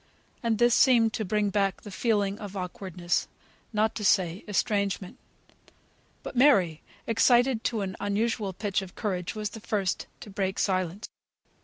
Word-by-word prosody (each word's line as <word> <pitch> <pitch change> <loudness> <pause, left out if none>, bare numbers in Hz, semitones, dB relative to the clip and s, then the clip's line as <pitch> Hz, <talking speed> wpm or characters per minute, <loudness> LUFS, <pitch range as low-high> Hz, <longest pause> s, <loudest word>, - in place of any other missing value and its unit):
And 230 -2 +1
this 240 +1 +4
seemed 235 -4 +5
to 220 - -2
bring 210 +1 0
back 195 -1 0
the 205 - -9
feeling 205 -1 0
of 205 -2 -7
awkwardness, 180 -1 -2 0.4
not 220 0 +1
to 215 - -5
say 185 -2 +2
estrangement. 200 -2 -1 1.0
But - - -7
Mary, 195 - +4 0.2
excited 240 +1 +3
to 225 -3 0
an 190 -1 -3
unusual 205 0 -1
pitch 195 +1 -1
of 190 -2 -10
courage, 185 -3 -3
was 210 -1 -3
the 220 - -8
first 200 -3 -2
to 205 - -9
break 190 0 -2
silence. 185 +1 -1
205 Hz, 150 wpm, -27 LUFS, 190-220 Hz, 1.0 s, seemed